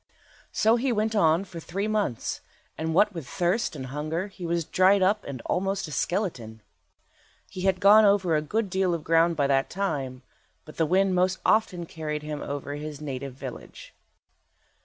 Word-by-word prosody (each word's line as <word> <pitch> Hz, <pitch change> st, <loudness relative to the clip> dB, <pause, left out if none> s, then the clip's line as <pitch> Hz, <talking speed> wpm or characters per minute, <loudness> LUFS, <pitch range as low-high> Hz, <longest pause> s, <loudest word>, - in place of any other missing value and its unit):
So 225 Hz, +2 st, +3 dB
he 255 Hz, +2 st, 0 dB
went 220 Hz, 0 st, 0 dB
on 165 Hz, -2 st, +3 dB
for 180 Hz, -3 st, -9 dB
three 195 Hz, +5 st, -3 dB
months, 210 Hz, -, -2 dB, 0.3 s
and 160 Hz, 0 st, -3 dB
what 210 Hz, +3 st, +4 dB
with 165 Hz, -7 st, -7 dB
thirst 180 Hz, -, 0 dB
and 135 Hz, -3 st, -6 dB
hunger 155 Hz, +8 st, -3 dB
he 185 Hz, -3 st, -7 dB
was 170 Hz, -1 st, -1 dB
dried 190 Hz, +3 st, +4 dB
up 205 Hz, +3 st, +2 dB
and 130 Hz, -4 st, -6 dB
almost 195 Hz, 0 st, -1 dB
a -, -, -9 dB
skeleton. 130 Hz, -, -3 dB, 0.9 s
He 185 Hz, -, -6 dB
had 185 Hz, -1 st, -1 dB
gone 205 Hz, +2 st, +7 dB
over 200 Hz, -5 st, +3 dB
a 150 Hz, -, +2 dB
good 210 Hz, +8 st, -1 dB
deal 185 Hz, -2 st, +1 dB
of 160 Hz, -, -6 dB
ground 165 Hz, +1 st, +3 dB
by 145 Hz, -2 st, +1 dB
that 135 Hz, -1 st, +1 dB
time, 135 Hz, -10 st, -3 dB, 0.4 s
but 155 Hz, -, -13 dB
the 160 Hz, -, +2 dB
wind 190 Hz, +3 st, +3 dB
most 185 Hz, +1 st, +2 dB
often 185 Hz, -6 st, +2 dB
carried 155 Hz, -2 st, -5 dB
him 150 Hz, -1 st, -5 dB
over 145 Hz, 0 st, -5 dB
his 150 Hz, 0 st, -6 dB
native 135 Hz, -3 st, -6 dB
village. 130 Hz, -2 st, -9 dB
170 Hz, 180 wpm, -26 LUFS, 150-195 Hz, 0.9 s, gone